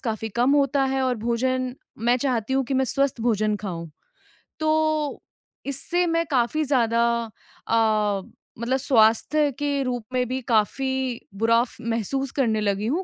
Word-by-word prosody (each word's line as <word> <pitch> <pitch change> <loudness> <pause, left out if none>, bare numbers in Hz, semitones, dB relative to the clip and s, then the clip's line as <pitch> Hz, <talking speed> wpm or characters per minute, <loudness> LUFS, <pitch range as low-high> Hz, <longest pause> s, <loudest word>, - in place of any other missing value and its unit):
काफ़ी 225 -2 -3
कम 245 +3 +3
होता 275 -1 +2
है 265 - +1
और 255 -1 +1
भोजन 255 +1 0 0.3
मैं 240 +1 +4
चाहती 250 -2 -1
हूँ 270 -1 +2
कि 270 - -3
मैं 265 0 +2
स्वस्थ 275 -1 0
भोजन 215 -2 +1
खाऊँ। 170 -5 -6 0.7
तो 310 -1 +1 0.5
इससे 350 +6 0
मैं 330 0 +1
काफ़ी 260 +4 +1
ज़्यादा 235 -5 +2 0.7
अ, 215 -3 +2 0.4
मतलब 240 +3 0
स्वास्थ्य 260 +4 +3
के 290 0 0
रूप 245 -3 -2
में 250 0 +1
भी 255 +2 -2
काफ़ी 230 +4 +1 0.5
बुरा 230 +2 +4
फ़ 240 - -12
महसूस 240 +4 -2
करने 230 -6 +1
लगी 205 0 0
हूँ, 325 +10 0
250 Hz, 150 wpm, -24 LUFS, 225-275 Hz, 0.7 s, मैं